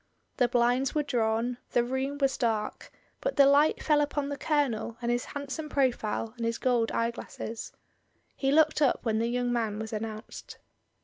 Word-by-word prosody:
The 245 Hz, -, +4 dB
blinds 245 Hz, +3 st, +2 dB
were 300 Hz, -, +2 dB
drawn, 240 Hz, -1 st, 0 dB
the 240 Hz, -, +4 dB
room 265 Hz, +3 st, -2 dB
was 275 Hz, -1 st, +1 dB
dark, 225 Hz, -4 st, -2 dB, 0.3 s
but -, -, -2 dB
the 280 Hz, -, +7 dB
light 285 Hz, +3 st, +4 dB
fell 300 Hz, -1 st, +4 dB
upon 290 Hz, -1 st, -1 dB
the 285 Hz, -, -2 dB
Colonel 265 Hz, -7 st, -1 dB
and 240 Hz, -1 st, -1 dB
his 240 Hz, 0 st, 0 dB
handsome 285 Hz, +2 st, -5 dB
profile 235 Hz, -5 st, 0 dB
and 235 Hz, -, -5 dB
his 230 Hz, -, -1 dB
gold 240 Hz, -3 st, +1 dB
eyeglasses. 230 Hz, -1 st, -4 dB, 0.6 s
He 270 Hz, -1 st, 0 dB
looked 310 Hz, +1 st, +4 dB
up 275 Hz, -, +3 dB
when 220 Hz, -2 st, +1 dB
the 230 Hz, -, +1 dB
young 245 Hz, 0 st, 0 dB
man 225 Hz, -3 st, -1 dB
was 220 Hz, 0 st, -5 dB
announced. 215 Hz, +1 st, -6 dB
245 Hz, 175 wpm, -29 LUFS, 230-280 Hz, 0.6 s, the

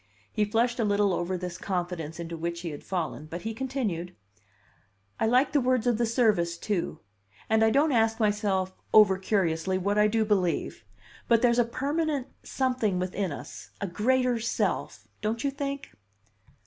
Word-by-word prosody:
He 210 Hz, -, +2 dB
flushed 235 Hz, +3 st, +1 dB
a -, -, +2 dB
little 205 Hz, -2 st, +2 dB
over 175 Hz, +1 st, -1 dB
this 180 Hz, -1 st, -6 dB
confidence 175 Hz, -4 st, -3 dB
into 170 Hz, 0 st, -5 dB
which 170 Hz, +1 st, -4 dB
he 170 Hz, -2 st, -4 dB
had 145 Hz, -, -8 dB
fallen, 165 Hz, -4 st, -3 dB
but 170 Hz, +3 st, -7 dB
he 225 Hz, +1 st, -3 dB
continued: 220 Hz, -9 st, -3 dB, 1.0 s
"I 220 Hz, -, +2 dB
like 250 Hz, +5 st, +3 dB
the 290 Hz, -, +3 dB
words 255 Hz, -1 st, +1 dB
of 240 Hz, -2 st, +2 dB
the 235 Hz, -, +2 dB
service, 210 Hz, -8 st, +2 dB
too, 195 Hz, -1 st, -2 dB, 0.5 s
and 220 Hz, 0 st, +3 dB
I 220 Hz, -, +5 dB
don't 290 Hz, +6 st, +3 dB
ask 225 Hz, -2 st, +2 dB
myself 205 Hz, -3 st, +1 dB, 0.2 s
over 200 Hz, -3 st, +7 dB
curiously 185 Hz, -2 st, 0 dB
what 200 Hz, +3 st, 0 dB
I 210 Hz, -, +5 dB
do 220 Hz, +1 st, +1 dB
believe; 185 Hz, -, 0 dB, 0.4 s
but 230 Hz, 0 st, +4 dB
there's 240 Hz, 0 st, +4 dB
a -, -, +6 dB
permanent 285 Hz, +3 st, -1 dB, 0.2 s
something 250 Hz, -7 st, 0 dB
within 185 Hz, 0 st, -2 dB
us 105 Hz, -6 st, -8 dB
a 200 Hz, -, -2 dB
Greater 245 Hz, +6 st, +1 dB
Self 230 Hz, +1 st, -2 dB
don't 220 Hz, +2 st, -2 dB
you 280 Hz, -, +1 dB
think?" 280 Hz, 0 st, -4 dB
210 Hz, 170 wpm, -27 LUFS, 180-240 Hz, 1.0 s, over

